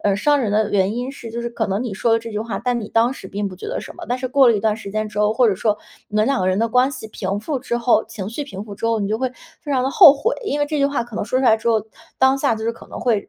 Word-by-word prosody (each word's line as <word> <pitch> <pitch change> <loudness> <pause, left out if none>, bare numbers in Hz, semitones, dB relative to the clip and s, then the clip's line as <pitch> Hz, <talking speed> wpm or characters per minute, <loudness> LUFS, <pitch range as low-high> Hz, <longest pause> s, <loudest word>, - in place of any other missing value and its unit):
嗯， 200 -1 +3
伤 290 +8 +3
人 225 -5 -1
的 215 0 +1
原 195 +1 +1
因 245 +3 -3
是 235 -4 -9
就 235 +1 -4
是 235 - -2
可 230 -2 -2
能 195 +4 -1
你 240 -5 -4
说 225 +3 +1
了 225 - +4
这 230 0 -8
句 210 - -3
话， 225 +1 -4
但 245 +1 -1
你 210 - -6
当 230 +3 +2
时 230 - -10
并 200 +1 -3
不 185 - -10
觉 - - -8
得 - - -3
什 - - -10
么。 - - -8
但 245 - 0
是 255 0 -3
过 265 -1 +5
了 230 - +4
一 200 - -2
段 215 -1 +1
时 220 -3 -8
间 215 +1 -2
之 210 - -7
后， 210 0 +3
或 235 +1 +3
者 200 - +2
说 210 +2 0 0.3
你 210 - -4
们 215 - +4
两 275 0 +1
个 185 - 0
人 185 +1 +1
的 230 - +1
关 250 +3 +3
系 255 -5 -8
平 200 -1 -3
复 275 +4 -2
之 240 -2 -2
后、 235 -2 +2
情 215 -4 -6
绪 290 +6 -4
平 200 -8 -7
复 205 -2 -9
之 230 - -3
后， 230 -1 +1
你 200 - -1
就 220 - -1
会 260 0 -1 0.3
非 290 -4 -4
常 255 - +2
地 265 - 0
后 310 -2 +9
悔。 445 - 0
因 295 -8 -1
为 290 - +2
这 305 +1 -2
句 280 - +3
话 280 -3 -1
可 235 -3 -10
能 - - -1
说 255 +4 0
出 - - 0
来 220 -3 +6
之 230 +1 -3
后， 220 -2 +2 0.4
当 265 +1 +4
下 275 -4 +2
就 220 0 -6
是 230 - 0
可 - - -14
能 - - -7
会 225 -4 0
230 Hz, 385 characters per minute, -20 LUFS, 210-255 Hz, 0.4 s, 后